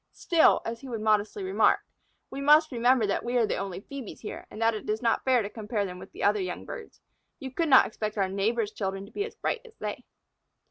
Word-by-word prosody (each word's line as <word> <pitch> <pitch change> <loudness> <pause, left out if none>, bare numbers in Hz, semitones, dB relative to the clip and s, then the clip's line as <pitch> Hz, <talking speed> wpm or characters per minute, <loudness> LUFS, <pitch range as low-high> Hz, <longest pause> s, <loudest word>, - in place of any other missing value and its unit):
"Still," 335 -2 +4
as 230 0 -4
he 270 - -9
would 230 -3 -4
modestly 215 - +1
remark, 380 +1 +3 0.5
"we 275 - -5
must 300 +2 +5
remember 245 -1 +3
that 200 - -1
we 245 +1 0
are 235 - +4
the - - -2
only 195 -2 -4
Phœbes 270 -1 -8
here, 215 - -7
and - - -10
that 225 0 +3
it 215 - -6
is 215 +1 0
not 230 - +2
fair 255 -3 +3
to - - -3
compare 210 -1 -3
them 180 -1 -7
with - - -11
the - - -17
young - - +4
of 210 - 0
other 185 -2 -4
birds. 460 -3 -9 0.4
You 265 -3 -6
could 330 +4 -1
not 260 - +8
expect 215 0 -4
our 195 -1 +2
neighbors' 210 +3 0
children 195 -1 -4
to 200 - -16
be 410 - -2
as 465 - -9
bright 465 - -2
as 470 -2 -16
they." - - -5
230 Hz, 245 wpm, -28 LUFS, 205-270 Hz, 0.5 s, not